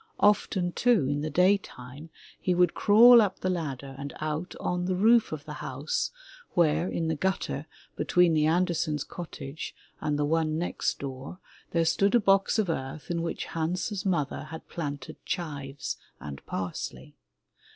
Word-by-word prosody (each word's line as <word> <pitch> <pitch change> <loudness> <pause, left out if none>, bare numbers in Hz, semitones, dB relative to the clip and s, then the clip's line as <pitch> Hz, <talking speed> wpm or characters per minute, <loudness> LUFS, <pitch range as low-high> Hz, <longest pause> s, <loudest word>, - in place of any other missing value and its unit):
Often, 190 -3 +3
too, 235 - +3
in 145 +1 -1
the 155 - -2
day 185 +6 +4
time 135 0 -11 0.3
he 180 - +1
would 180 -1 +4
crawl 235 +3 +8
up 200 -3 -1
the 185 - +1
ladder 140 -6 -4
and 140 0 -6
out 155 +3 -3
on 180 0 -1
the 185 0 0
roof 225 +4 +4
of 155 -2 -5
the - - -6
house - - -2 0.5
where 165 0 +3
in 165 - -1
the 160 - +1
gut 190 +5 0
ter 145 +4 -4 0.3
between 180 -2 +3
the 155 -1 +3
Andersen's 160 -3 +1
cottage 160 -4 -7 0.2
and 150 -1 -1
the 145 - +1
one 155 0 +1
next 175 - -1
door, 135 +4 -7 0.3
there 165 -1 +1
stood 200 +6 +3
a - - +7
box 195 0 +3
of 215 -3 +2
earth 145 +1 -4
in 170 -1 -1
which 165 - -3
Hans's 180 +5 -2
mother 160 -9 -1
had 160 +1 -9
planted 145 -5 -6
chives 145 -5 -4 0.2
and 70 -2 -8
parsley. 90 -2 -5
165 Hz, 165 wpm, -28 LUFS, 145-185 Hz, 0.5 s, crawl